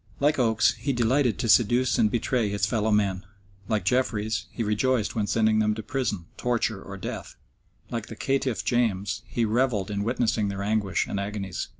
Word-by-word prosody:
Like 145 +1 +2
Oates, 110 -3 +3
he 140 - -1
delighted 120 0 +2
to - - -2
seduce 120 +3 +4
and 110 - +4
betray 120 -1 0
his 100 0 0
fellow 110 0 0
men; 100 -3 +1 0.4
like 110 -3 -1
Jeffreys, 115 -4 0
he 115 - -3
rejoiced 110 +2 +1
when 105 -2 0
sending 110 0 +2
them 105 0 +2
to 110 - -6
prison, 115 - -2
torture, 115 -4 -1
or 100 0 -8
death; - - -6 0.6
like 115 -2 -3
the 115 - -8
caitiff 135 -1 -1
James, 105 -5 0
he 115 - 0
revelled 110 -3 0
in 100 0 -1
witnessing 115 -2 0
their 100 0 -3
anguish 105 -2 0
and 100 - -3
agonies. 100 -2 -4
110 Hz, 180 wpm, -26 LUFS, 105-120 Hz, 0.6 s, seduce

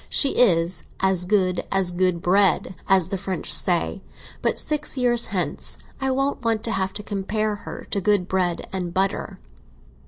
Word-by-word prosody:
She 280 - +4
is 175 -8 +3 0.2
as 190 -2 +1
good 185 -2 +1
as 195 -2 +1
good 180 -1 0
bread, 190 0 +3 0.2
as 190 -3 +4
the 195 - -3
French 190 -1 +1
say; - - +2 0.4
but - - +1
six 300 -2 -1
years 240 -2 +2
hence 180 -7 -2 0.2
I 270 - -1
don't 270 +1 -1
want 225 -1 0
to 230 - -1
have 190 -2 -1
to 210 - -7
compare 210 +2 -2
her - - -9
to 200 - 0
good 205 -3 +2
bread 180 -3 -1
and 180 -2 -4
butter." 195 +1 -1
195 Hz, 165 wpm, -23 LUFS, 180-215 Hz, 0.4 s, She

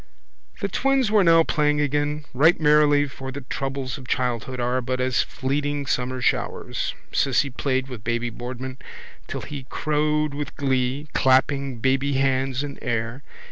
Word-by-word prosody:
The - - +1
twins 270 -5 +1
were 210 -2 +5
now 165 -1 +6
playing 150 -2 +1
again 145 +1 0
right 155 +7 +4
merrily 150 -1 +4
for 135 0 -7
the 140 +2 -6
troubles 135 0 -4
of 130 - -12
childhood 125 0 -1
are 125 +1 0
but 130 +1 -2
as 130 0 +2
fleeting 145 +2 -2
summer 130 0 -1
showers. - - -1 0.2
Cissy 140 +1 +2
Caffrey 120 - -8
played 130 -1 0
with 125 -6 -8
baby 120 +1 -1
Boardman 130 +2 -6 0.5
till - - -4
he 135 -3 -7
crowed 150 0 0
with 145 -1 -5
glee, 135 +1 0
clapping 135 0 +2
baby 135 +3 +1
hands 135 0 +1
in 140 -1 -6
air. 120 +1 -2
135 Hz, 155 wpm, -24 LUFS, 130-145 Hz, 0.5 s, now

